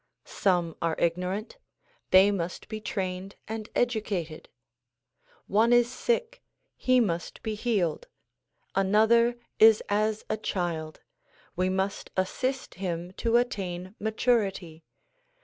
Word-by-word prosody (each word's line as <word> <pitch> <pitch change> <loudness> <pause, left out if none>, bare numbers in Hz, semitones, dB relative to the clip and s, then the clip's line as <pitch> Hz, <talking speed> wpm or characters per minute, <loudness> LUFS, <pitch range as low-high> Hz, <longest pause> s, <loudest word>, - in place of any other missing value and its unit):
Some 175 -4 0
are 165 -1 0
ignorant; 180 - -2 0.5
they 190 +2 +7
must 175 -3 -4
be 215 -1 -6
trained 190 -1 -4
and 220 -1 -5
educated. 205 -9 -1 1.0
One 220 +4 +3
is 240 0 +4
sick; 480 - -1 0.3
he 255 0 +3
must 175 -7 -2
be 220 -1 -2
healed. 210 - -1 0.7
Another 220 +5 +4 0.2
is 220 -1 +7
as 215 +1 0
a 215 - -1
child; 170 -6 -3 0.5
we 185 +1 +1
must 190 +2 -2
assist 255 +8 -1
him 175 -1 -3
to 230 0 +3
attain 185 -6 -2
maturity. 200 -7 0
205 Hz, 110 wpm, -28 LUFS, 180-230 Hz, 1.0 s, they